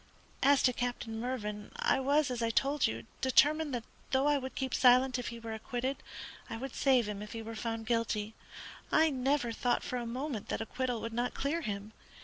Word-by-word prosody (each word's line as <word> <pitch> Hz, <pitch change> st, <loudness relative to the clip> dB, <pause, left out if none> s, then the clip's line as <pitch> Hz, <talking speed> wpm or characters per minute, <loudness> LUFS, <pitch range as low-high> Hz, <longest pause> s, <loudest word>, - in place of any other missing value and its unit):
As 280 Hz, 0 st, +5 dB
to 250 Hz, -, +4 dB
Captain 245 Hz, -2 st, -3 dB
Mervyn, 210 Hz, -4 st, -4 dB
I -, -, +2 dB
was, 280 Hz, +1 st, +2 dB
as 245 Hz, -1 st, -2 dB
I 230 Hz, -, +1 dB
told 275 Hz, +5 st, +2 dB
you, 115 Hz, +1 st, -5 dB, 0.2 s
determined 295 Hz, +3 st, +4 dB
that 235 Hz, -, -3 dB, 0.3 s
though 265 Hz, +1 st, +2 dB
I 295 Hz, -1 st, +3 dB
would 260 Hz, 0 st, -6 dB
keep 265 Hz, -2 st, -2 dB
silent 255 Hz, 0 st, +5 dB
if 245 Hz, -, -4 dB
he 235 Hz, -, -5 dB
were 230 Hz, -1 st, -6 dB
acquitted, 245 Hz, +4 st, -2 dB, 0.5 s
I 230 Hz, -, -4 dB
would 270 Hz, +2 st, -6 dB
save 255 Hz, -5 st, +3 dB
him 205 Hz, -1 st, -4 dB
if 210 Hz, -, -7 dB
he 225 Hz, -1 st, -5 dB
were 225 Hz, +1 st, -6 dB
found 225 Hz, 0 st, -3 dB
guilty. 220 Hz, -2 st, 0 dB, 0.6 s
I 320 Hz, 0 st, +5 dB
never 265 Hz, -2 st, +1 dB
thought 245 Hz, +1 st, 0 dB
for 250 Hz, -, -3 dB
a 240 Hz, -1 st, -3 dB
moment 250 Hz, -1 st, -4 dB
that -, -, -1 dB
acquittal 245 Hz, +1 st, -2 dB
would 230 Hz, 0 st, -4 dB
not 240 Hz, +2 st, -1 dB
clear 300 Hz, +5 st, -1 dB
him. 210 Hz, -3 st, -5 dB
245 Hz, 205 wpm, -32 LUFS, 225-265 Hz, 0.6 s, As